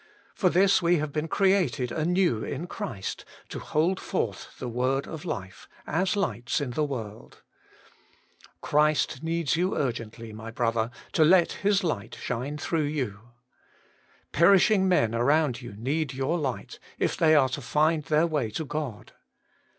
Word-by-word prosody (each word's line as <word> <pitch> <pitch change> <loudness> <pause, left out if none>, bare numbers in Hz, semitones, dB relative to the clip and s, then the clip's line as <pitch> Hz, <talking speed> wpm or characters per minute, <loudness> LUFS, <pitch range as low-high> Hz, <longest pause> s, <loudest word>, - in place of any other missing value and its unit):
For 185 - +2
this 190 +2 +4
we 175 0 +3
have 150 -1 -2
been 155 +1 -1
created 185 -10 +1
anew 170 - +1
in 145 +5 -4
Christ, 100 - -5 0.3
to - - -5
hold 170 +5 0
forth 110 - -4
the 125 - -5
Word 130 +3 0
of 160 +1 -7
Life, 95 - -6 0.2
as 185 +6 0
lights 150 -11 -1
in 140 -4 -3
the 150 +5 0
world. 115 -7 -6 1.2
Christ 150 -2 +1
needs 165 -2 0
you 180 +3 0
urgently, 115 -3 -4
my 110 +1 -8
brother, 115 -1 0 0.2
to 160 - +4
let 170 +2 +5
His 200 -1 +1
light 135 - -3
shine 130 +5 -3
through 155 0 -1
you. 120 -7 -4 1.0
Perishing 190 +3 +5
men 115 -11 +2
around 140 +2 +2
you 120 -4 -9
need 140 +4 -2
your 135 +6 0
light, 130 -9 -4 0.2
if - - 0
they 155 -1 +4
are 135 -3 +4
to 135 +3 -4
find 155 +4 +1
their 155 +2 +3
way 150 -9 -1
to 155 +9 -4
God. 145 -7 -5
150 Hz, 150 wpm, -27 LUFS, 120-170 Hz, 1.2 s, let